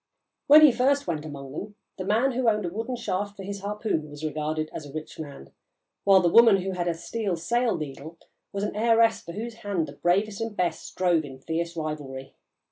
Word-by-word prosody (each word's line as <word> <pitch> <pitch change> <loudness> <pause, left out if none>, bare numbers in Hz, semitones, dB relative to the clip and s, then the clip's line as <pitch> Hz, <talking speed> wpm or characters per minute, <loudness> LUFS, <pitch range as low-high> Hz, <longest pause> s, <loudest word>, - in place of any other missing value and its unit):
When 300 +2 +9
he 300 -3 +9
first 275 +3 +2
went 160 -3 -3
among 140 -3 -8
them, 205 +8 -7 0.2
the 185 - -3
man 225 +7 +2
who 250 -1 +2
owned 210 -3 0
a - - -1
wooden 225 +7 -4
shaft 205 -3 -3
for 195 - -7
his 200 0 -6
harpoon 205 -6 -2
was 145 +1 -7
regarded 155 0 -2
as 155 - -6
a - - -11
rich 155 +1 -7
man, 140 - -9 0.5
while 195 -1 +7
the 175 - +3
woman 225 +3 +7
who 190 - -2
had 175 -2 -2
a 170 - 0
steel 185 +3 -3
sail 235 +7 0
needle 150 +2 -7 0.3
was 200 0 -3
an 210 - -2
heiress 230 +1 +3
for 170 - -9
whose 225 +3 -6
hand 195 -6 -1
the 140 - -9
bravest 200 +7 0
and 225 -2 -4
best 170 -3 -1
strove 175 -3 +1
in 135 -3 -9
fierce 170 +4 -3
rivalry. 145 -4 -5
185 Hz, 210 wpm, -26 LUFS, 155-220 Hz, 0.5 s, When